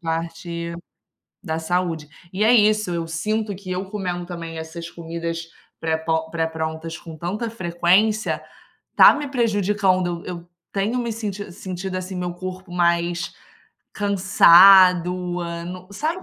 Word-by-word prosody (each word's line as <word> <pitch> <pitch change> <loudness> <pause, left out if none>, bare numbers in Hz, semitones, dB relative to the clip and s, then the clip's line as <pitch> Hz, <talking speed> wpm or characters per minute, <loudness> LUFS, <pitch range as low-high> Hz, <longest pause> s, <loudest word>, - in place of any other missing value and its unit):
parte 170 0 -4 0.7
da 160 -3 -3
saúde. 165 -2 -2 0.2
E 195 +3 -1
é 225 - +5
isso, 215 -3 +4
eu 170 -1 -2
sinto 210 +6 -2
que 185 0 -9
eu 185 +2 -2
comendo 180 -3 -4
também 165 -2 -7
essas 165 +1 -7
comidas 165 0 -5 0.3
pré-po 160 0 -1
pré-prontas 160 0 -3
com 165 -2 -10
tanta 195 +9 -3
frequência 195 +2 +1 0.5
está - - +8
me 290 -1 -4
prejudicando, 200 -7 +1
eu 175 -1 -7 0.3
tenho 210 +5 0
me 235 -1 -2
senti 205 -2 -5
sentido 185 +1 -5
assim 185 +1 -5
meu 180 -1 -3
corpo 185 0 -7
mais 175 0 0 0.6
cansado 185 -2 +6 0.5
no 180 +1 -8
sabe 320 - -2
180 Hz, 125 wpm, -22 LUFS, 170-200 Hz, 0.7 s, está